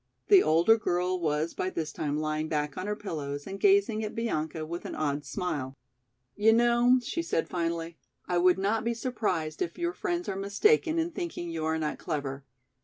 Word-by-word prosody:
The 395 -2 +8
older 170 +8 +4
girl 180 -1 0
was 155 0 0
by 185 - -2
this 160 -4 -4
time 150 -1 -2
lying 155 0 -1
back 150 -2 -2
on 185 - -4
her 210 - -1
pillows 145 -8 -5
and 195 0 -6
gazing 385 - +3
at 215 - -5
Bianca 160 -8 -2
with 170 +2 -5
an - - -5
odd 145 -1 -1
smile. 145 -8 -3 0.6
"You 220 +2 +5
know," 240 +2 +4
she 335 - -2
said 335 - -1
finally, 165 -1 -3 0.3
"I 175 -1 +1
would 180 +1 +5
not 205 +4 0
be 235 0 -1
surprised 220 -10 -2
if 360 - -2
your 345 0 -1
friends 355 -4 -2
are 195 - -2
mistaken 315 - +2
in 330 +1 0
thinking 330 - -5
you 160 -1 -3
are 160 0 +1
not 155 -1 -3
clever. 140 -4 -4
180 Hz, 190 wpm, -29 LUFS, 155-230 Hz, 0.6 s, The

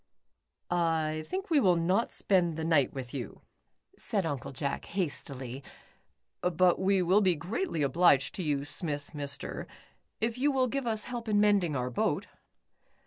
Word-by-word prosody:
" - - -25 0.4
I 155 0 -4
think 380 0 -4
we 305 - +5
will 185 -8 +4
not 185 +7 +1
spend 175 -5 +1
the 160 - -3
night 160 -5 +3
with 130 -3 -7
you," 130 -4 -6 0.6
said 200 -4 0
Uncle 145 -6 -3
Jack, 140 +1 -3
hastily. 140 -7 -4 0.8
"But 180 0 +3
we 190 0 +3
will 185 +4 +4
be 185 -3 +3
greatly 175 - -2
obliged 140 -2 +4
to 185 - -4
you 145 -3 0
Smith 145 -2 -3
Mr. 140 -2 -5 0.5
if 230 +2 -1
you 290 +2 +3
will 265 -2 +2
give 265 0 -2
us 220 -2 0
help 240 -2 -5
in 205 -1 +3
mending 200 -7 +3
our 125 -1 -2
boat." - - 0
175 Hz, 160 wpm, -30 LUFS, 145-210 Hz, 0.8 s, we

